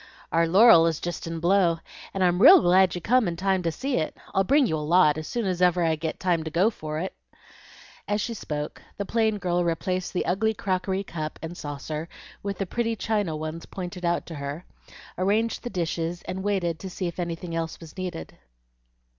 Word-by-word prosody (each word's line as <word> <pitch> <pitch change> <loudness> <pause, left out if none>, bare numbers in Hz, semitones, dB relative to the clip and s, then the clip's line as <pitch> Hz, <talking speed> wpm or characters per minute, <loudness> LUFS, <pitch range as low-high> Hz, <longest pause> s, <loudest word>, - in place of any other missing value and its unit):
"Our 165 0 +3
laurel 180 -2 +7
is 160 -2 -1
jest 175 -1 -5
in 165 0 -4
blow, 175 -1 +3 0.3
and 195 - -1
I'm 180 +1 +2
real 355 - +10
glad 185 - +4
you 175 - -4
come 245 +2 +3
in 170 - -2
time 190 +1 +1
to 170 -1 0
see 265 - -2
it. 155 - -2 0.2
I'll 195 - +3
bring 280 +7 +4
you 160 - 0
a - - -3
lot, 150 0 +4
as 155 - -7
soon's 190 -7 -2
ever 180 -1 +4
I 160 -1 +2
get 160 +1 -4
time 175 -3 +1
to 160 - -4
go 180 +8 +2
for 155 -6 -5
it." 185 +4 -3 0.9
As 205 0 0
she 230 +3 -2
spoke, 150 -8 -5 0.2
the 200 - -3
plain 220 0 +1
girl 175 -2 0
replaced 180 +2 -2
the 180 - -1
ugly 220 +4 +1
crockery 190 0 -1
cup 155 -4 -5
and 165 +2 -5
saucer 150 +2 -5 0.3
with 200 -1 -4
the 195 - -2
pretty 230 +4 -1
china 205 -7 -1
ones 155 +2 -5
pointed 180 -1 -7
out 170 0 0
to 165 - -8
her, 140 +4 -5 0.5
arranged 215 +5 +1
the 245 - -5
dishes, 170 -2 -2
and 185 +1 -5
waited 185 -5 -1
to 190 - -6
see 185 +1 -4
if 170 +1 -4
anything 170 0 -4
else 165 -1 -3
was 165 -2 -12
needed. 180 - -6
180 Hz, 205 wpm, -26 LUFS, 165-195 Hz, 0.9 s, real